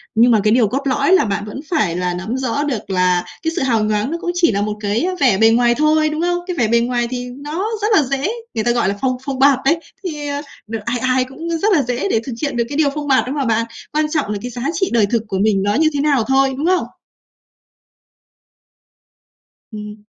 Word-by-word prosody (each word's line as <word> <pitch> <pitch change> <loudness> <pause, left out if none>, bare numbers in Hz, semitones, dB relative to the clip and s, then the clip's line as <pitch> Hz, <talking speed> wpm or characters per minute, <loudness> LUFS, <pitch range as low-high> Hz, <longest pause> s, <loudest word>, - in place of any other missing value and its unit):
Nhưng 235 +2 +5
mà 220 - +4
cái 215 0 +3
điều 235 -3 +4
cốt 275 +6 -2
lõi 280 +5 +1
là 380 - +5
bạn 200 -1 -2
vẫn 210 +5 -7
phải 215 - +1
là 180 0 -1
nắm 200 +8 -4
rõ 265 +2 -1
được 255 -10 -3
là 180 -1 +2 0.2
cái 325 - 0
sự - - -1
hào 230 -5 +1
nhoáng 215 +6 0
nó 335 - -2
cũng 350 - -1
chỉ 350 -2 +3
là 200 -1 -1
một 210 0 -2
cái, 210 +1 -1
ơ, 370 +1 -1
vẻ 245 -8 +4
bề 225 +1 +5
ngoài 240 +1 +3
thôi, 310 +1 +3
đúng 305 +1 -3
không? 350 0 +1
Cái 360 -2 -4
vẻ 235 - +2
bề 235 +2 +3
ngoài 240 0 0
thì 250 -1 -3
nó 295 +10 -4
rất 420 - +1
là 310 - +5
dễ, 275 +6 -1 0.3
người 220 - 0
ta, 240 - +2
gọi 235 -5 +1
là, 200 - -3
phông 255 -1 0
phông 270 -2 -3
bạt 275 -1 +5
đấy, 320 +4 +3 0.2
thì, 300 -5 -4
ờ, 285 0 -3 0.3
đ 225 - -5
ai 240 +1 -1
ai 255 +1 +2
cũng, 320 +6 -8
ơ, 330 - 0
rất 405 +4 +2
là 295 - +3
dễ 245 +8 -2
để 225 - +2
thực 260 - -5
hiện 285 -4 -2
được 235 - +2
cái 285 - -4
điều 305 -2 +3
phông 295 -1 -4
bạt 265 -2 +3
đó 260 - -2
mà 285 -2 -1
bạn, 230 0 +1 0.3
quan 305 0 +2
trọng 290 -9 -1
là 210 - -2
cái 245 - -6
giá 240 +1 -6
trị 380 +1 0
đời 225 -3 +4
thực 225 +2 -1
của 195 -2 -2
mình 200 -1 +2
nó 205 +1 +1
như 315 +2 +3
thế 285 - 0
nào 280 -6 +2
thôi, 270 0 +3
đúng 295 - -2
không? 365 +1 +2 2.9
Ừm. 210 -1 -9
255 Hz, 260 wpm, -18 LUFS, 220-295 Hz, 2.9 s, Nhưng